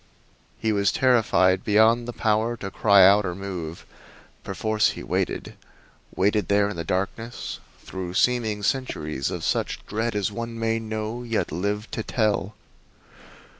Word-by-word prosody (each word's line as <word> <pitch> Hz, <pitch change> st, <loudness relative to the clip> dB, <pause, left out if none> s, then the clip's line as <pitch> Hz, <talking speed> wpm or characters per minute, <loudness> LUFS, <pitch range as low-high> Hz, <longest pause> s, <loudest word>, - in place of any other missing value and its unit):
He 110 Hz, -, 0 dB
was 100 Hz, -1 st, +2 dB
terrified 110 Hz, -, +3 dB
beyond 110 Hz, +3 st, +4 dB
the -, -, -3 dB
power 110 Hz, +1 st, 0 dB
to 95 Hz, -3 st, -6 dB
cry 100 Hz, -3 st, +6 dB
out 100 Hz, +2 st, +6 dB
or 90 Hz, -3 st, -3 dB
move. 90 Hz, -4 st, -6 dB, 0.6 s
Perforce 110 Hz, 0 st, +1 dB
he -, -, -8 dB
waited -, -, -2 dB, 0.6 s
waited 105 Hz, +2 st, +1 dB
there 100 Hz, 0 st, +3 dB
in 105 Hz, -, -5 dB
the 85 Hz, -, -4 dB
darkness 100 Hz, +7 st, -3 dB, 0.2 s
through 90 Hz, -1 st, -6 dB
seeming 110 Hz, -4 st, +1 dB
centuries 75 Hz, -, -2 dB
of -, -, -5 dB
such -, -, -1 dB
dread 110 Hz, +1 st, -2 dB
as 105 Hz, 0 st, 0 dB
one 115 Hz, +2 st, -5 dB
may 115 Hz, 0 st, 0 dB
know, 110 Hz, +1 st, -4 dB
yet 115 Hz, -2 st, -2 dB
live 100 Hz, +6 st, -2 dB
to -, -, -3 dB
tell. 105 Hz, -2 st, -1 dB
105 Hz, 145 wpm, -24 LUFS, 95-115 Hz, 0.6 s, cry